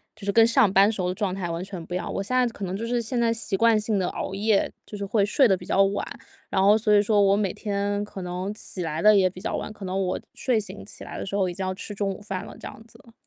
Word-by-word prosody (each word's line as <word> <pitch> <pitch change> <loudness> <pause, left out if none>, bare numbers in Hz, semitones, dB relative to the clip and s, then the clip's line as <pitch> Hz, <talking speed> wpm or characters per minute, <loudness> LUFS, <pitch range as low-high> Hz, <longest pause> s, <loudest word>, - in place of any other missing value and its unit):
就 205 -2 -9
是 200 - +1
跟 225 +2 +6
上 235 -5 +4
班 200 +3 +5
时 210 - -6
候 180 0 0
的 - - -1
状 190 -1 -1
态 185 -3 -3
完 170 +1 -3
全 190 -4 -7
不 175 - -8
一 - - +1
样。 - - -4
我 195 - -2
现 255 +5 -2
在 250 -1 +4
可 205 -4 -6
能 185 +1 -3
就 230 +3 -4
是 240 0 0
现 240 +2 -2
在 230 -1 +3
习 225 -3 -2
惯 225 +1 +4
性 210 -2 0
地 180 - 0
熬 190 - -5
夜， 205 0 +1
就 210 - -8
是 200 - -4
会 200 0 +2
睡 245 +5 +4
得 190 - +4
比 - - -10
较 195 - +3
晚， 195 +1 0 0.5
然 190 - 0
后 205 +2 +6
所 215 -1 +2
以 - - +7
说 205 0 +3
我 200 0 +4
每 200 -4 0
天 205 -1 -2
可 195 -3 -8
能 180 +3 -4
起 185 - -6
来 160 -1 -3
得 210 +3 +6
也 185 -2 +4
比 185 - -11
较 205 - -3
晚， - - -4
可 205 -2 -9
能 190 +1 -1
我 - - -1
睡 245 -4 0
醒 200 - -8
起 - - -10
来 - - -7
的 - - -4
时 200 - -4
候 190 -2 +2
已 175 - -4
经 190 - -5
要 185 - -1
吃 205 - -7
中 200 0 -1
午 190 - -7
饭 195 -2 -5
了 - - -11
这 - - -8
样 220 - -11
子。 230 0 -17
200 Hz, 345 characters per minute, -25 LUFS, 190-215 Hz, 0.5 s, 以